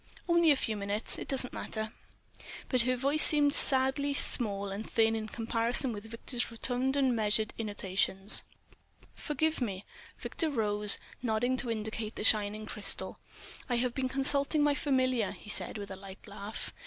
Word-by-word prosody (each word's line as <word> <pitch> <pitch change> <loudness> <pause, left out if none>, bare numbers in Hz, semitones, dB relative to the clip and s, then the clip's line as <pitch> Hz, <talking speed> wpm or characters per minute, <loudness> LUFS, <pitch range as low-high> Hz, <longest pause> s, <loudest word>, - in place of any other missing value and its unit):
"Only 340 -1 +3
a 290 - +5
few 225 -4 -3
minutes. 205 +2 +1
It - - -7
doesn't 260 -2 +1
matter." 220 -1 -5 0.8
But 255 -2 +2
her 255 +2 0
voice 280 +4 +3
seemed 290 -2 +6
sadly 275 +1 +2
small 200 -7 +2
and 205 +3 -7
thin 225 -2 +1
in 215 -1 -4
comparison 230 +3 +1
with 210 +1 -8
Victor's 240 +2 -3
rotund 250 +3 0
and 265 -3 +1
measured 215 0 -1
intonations. 195 -1 +1 0.7
"Forgive 310 +1 -2
me." 200 -5 -4 0.3
Victor 325 - -3
rose, 210 -5 +3 0.2
nodding 245 +2 -1
to 245 - -1
indicate 220 0 -5
the - - -5
shining 215 0 +1
crystal. 210 -1 -4 0.5
"I 245 - 0
have 240 0 -1
been 260 0 -2
consulting 280 +3 +2
my 295 0 +3
familiar," 255 -6 0
he 215 - -11
said - - -3
with 200 -1 -8
a - - -6
light 190 0 -13
laugh. 200 +1 -7
230 Hz, 160 wpm, -30 LUFS, 210-265 Hz, 0.8 s, seemed